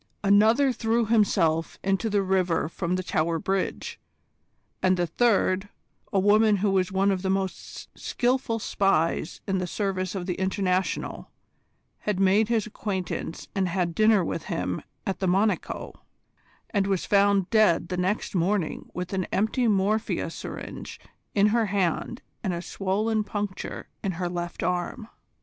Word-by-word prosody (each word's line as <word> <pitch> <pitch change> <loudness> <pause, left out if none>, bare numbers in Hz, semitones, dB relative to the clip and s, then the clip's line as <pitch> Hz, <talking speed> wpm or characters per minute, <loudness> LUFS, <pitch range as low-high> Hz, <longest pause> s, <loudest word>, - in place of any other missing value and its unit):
Another 220 +7 +5
threw 230 0 +1
himself 190 -7 +2
into 195 +3 +1
the 205 -1 +2
river 185 -4 +1
from 170 +2 -2
the 185 - -2
Tower 165 0 0
Bridge; 190 +3 -2 0.8
and 185 0 +3
the 175 - +1
third, 195 0 +2 0.4
a - - +1
woman 210 +2 +5
who 200 0 +1
was 190 -1 +1
one 195 +1 +2
of 190 -2 -1
the 190 - -1
most 190 0 -3
skilful 245 -2 0
spies 180 -6 0
in 190 -1 +1
the 180 - -2
service 185 -1 -2
of 185 -2 -3
the 180 - -1
International, 190 -1 -1 0.7
had 210 -3 -2
made 195 +3 +4
his 225 -3 +1
acquaintance 190 -6 -4
and 190 -2 +1
had 175 -1 -1
dinner 215 -1 +4
with - - -4
him - - -2 0.2
at 195 -3 -2
the 190 - 0
"Monico," 200 +4 0 0.8
and 200 -3 +1
was 195 -3 0
found 200 -2 +3
dead 210 -7 +4
the 185 - -2
next 185 +4 -1
morning 180 -1 0
with 180 +1 -4
an 185 -2 0
empty 220 +4 +1
morphia 210 +1 +1
syringe - - -7 0.4
in 205 0 +5
her 225 0 +2
hand 195 +4 -1 0.2
and 185 -5 -1
a 170 - -4
swollen 210 +4 0
puncture 205 -2 -5 0.2
in 195 - -1
her 175 +1 -2
left 175 -1 -4
arm. 180 +5 -2
195 Hz, 150 wpm, -26 LUFS, 185-210 Hz, 0.8 s, Another